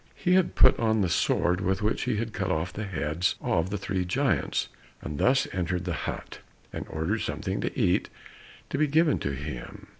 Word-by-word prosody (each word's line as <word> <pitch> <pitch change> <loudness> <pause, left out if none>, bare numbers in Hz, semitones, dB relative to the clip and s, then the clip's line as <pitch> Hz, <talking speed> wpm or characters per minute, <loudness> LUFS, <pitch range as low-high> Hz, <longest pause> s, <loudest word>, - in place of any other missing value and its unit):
He 180 -1 +1
had 185 -1 +3
put 130 - +6
on 110 -2 +2
the 95 - +1
sword 90 +2 +2
with 95 +2 0
which 110 - 0
he - - 0
had 115 0 -3
cut 95 -2 -2
off 85 +1 -1
the 105 - -4
heads 80 -2 -1
of 85 +2 0
the 105 - -2
three 95 -1 -2
giants, 90 - 0 0.3
and 75 -1 -6
thus 130 +1 +3
entered 90 -1 -1
the 90 - -1 0.2
hut, - - -7 0.3
and - - -5
ordered 80 +8 -1
something 100 -1 -2
to - - -3
eat 90 -6 +2 0.6
to 140 - -1
be 155 - +4
given 155 +1 +3
to 70 - -2
him. 65 -2 -7
95 Hz, 200 wpm, -27 LUFS, 85-110 Hz, 0.6 s, put